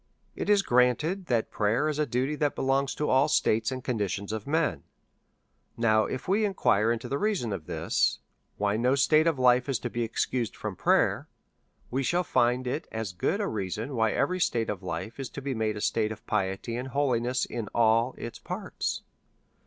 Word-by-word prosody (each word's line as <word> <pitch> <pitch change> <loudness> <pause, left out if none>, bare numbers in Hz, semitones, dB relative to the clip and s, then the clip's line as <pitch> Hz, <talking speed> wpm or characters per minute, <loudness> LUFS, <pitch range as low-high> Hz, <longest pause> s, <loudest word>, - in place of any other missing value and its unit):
It - - -3
is 205 -1 +5
granted 150 +10 +2
that 115 -3 0
prayer 110 +8 +1
is 150 -1 -2
a 150 - +1
duty 130 +4 0
that 145 -1 0
belongs 135 +1 0
to 150 - -1
all 135 +3 +4
states 110 -5 +2
and 130 -1 -5
conditions 100 -3 -2
of 110 +1 -5
men; 160 +2 +1 1.0
now, 110 -2 +3
if 130 - -5
we 200 +4 +2
inquire 115 - +2
into 120 +1 -3
the 140 +3 -2
reason 200 - 0 1.1
why 105 0 +1
no 125 +4 +2
state 155 +4 +4
of 160 -4 +2
life 125 +1 +4
is 135 - +1
to 120 - -5
be 120 - -2
excused 115 +1 -1
from 105 -3 -5
prayer, - - +2 0.6
we 130 +2 0
shall 175 +7 +1
find 125 -4 +1
it 130 +5 -3
as 110 -4 -4
good 175 - 0
a 205 - 0
reason 110 - -3
why 110 -2 +2
every 185 0 0
state 115 -10 +1
of 100 -3 -6
life 90 +7 -5
is 135 - -4
to - - -7
be 140 0 -3
made 110 -2 -1
a - - -5
state 110 0 +1
of 110 - -9
piety 95 +5 -1
and 125 +2 -4
holiness 125 -2 0
in 115 -3 -5
all 115 +2 +3
its 115 -1 -7
parts. - - -4
125 Hz, 190 wpm, -28 LUFS, 110-140 Hz, 1.1 s, is